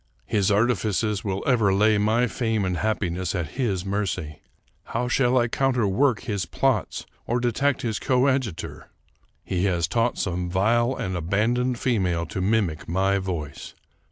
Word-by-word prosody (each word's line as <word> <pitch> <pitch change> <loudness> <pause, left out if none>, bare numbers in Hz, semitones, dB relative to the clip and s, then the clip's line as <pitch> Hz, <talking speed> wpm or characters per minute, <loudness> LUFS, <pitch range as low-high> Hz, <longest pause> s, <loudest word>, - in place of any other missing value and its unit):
His 100 -3 +1
artifices 105 -1 +1
will 95 -1 -2
ever 115 -7 +3
lay 105 +2 +3
my 110 +4 +2
fame 115 -4 -1
and 90 -1 -1
hap 110 0 -1
piness 90 0 -2
at 85 -5 -2
his 100 - -2
mercy. 90 -6 -3 0.4
How 120 +2 -2
shall 125 0 +2
I 120 -1 +3
counterwork 125 -1 +1
his 100 -4 -3
plots - - 0 0.2
or 120 +1 +1
detect 125 +3 0
his 110 -3 -1
coadjutor? 130 - 0 0.5
He 90 0 -1
has 85 -4 +1
taught 115 +7 0
some 90 -1 -2
vile 120 +7 +2
and 95 0 -3
aban 100 +7 +1
doned 125 0 0
female 95 -9 0
to 95 - -4
mimic 95 -6 0
my 95 +3 +1
voice. 85 -7 -5
105 Hz, 155 wpm, -24 LUFS, 95-120 Hz, 0.5 s, ever